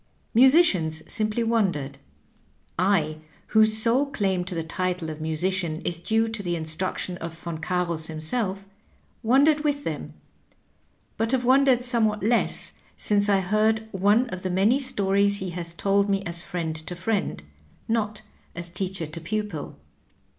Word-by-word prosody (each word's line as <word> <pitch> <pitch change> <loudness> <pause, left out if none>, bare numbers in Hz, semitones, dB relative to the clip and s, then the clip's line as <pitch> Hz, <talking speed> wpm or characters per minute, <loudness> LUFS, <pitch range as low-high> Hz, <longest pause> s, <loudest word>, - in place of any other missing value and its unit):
Musicians 220 - +4
simply 215 0 0
wondered. 180 -12 0 0.8
I, 165 -5 +2 0.3
whose 220 0 +4
sole 240 +6 +3
claim 195 -9 0
to 185 -1 -5
the 165 - -2
title 175 0 -2
of 155 0 -8
musician 160 +1 -1
is 170 -1 -3
due 225 +5 +1
to 220 -2 -4
the 175 -3 -2
instruc 160 +3 -2
tion 180 -1 -3
of 165 -1 -7
Von 165 -1 -6
Carus 170 -2 -1
himself, 190 +5 -2 0.6
wondered 280 +6 +4
with 290 -1 0
them, - - -5 1.0
but 225 +3 0
have 250 -2 +1
wondered 260 -1 +4
somewhat 220 -4 +1
less 230 +2 +1 0.2
since 205 0 +2
I 195 -1 +4
heard 215 +3 +1
one 205 +5 +3
of 185 - -5
the 185 - -2
inany 205 +9 +3
stories 200 -5 +1
he 190 -2 -4
has 170 -1 -5
told 200 +3 +1
me 195 0 +1
as 170 -2 -5
friend 170 -3 -4
to 180 - -5
friend, 190 - -2 0.4
not 215 -2 -1 0.3
as 170 0 -5
teacher 185 -1 -3
to 155 +2 -8
pupil. 180 - -4
195 Hz, 150 wpm, -25 LUFS, 170-220 Hz, 1.0 s, Musicians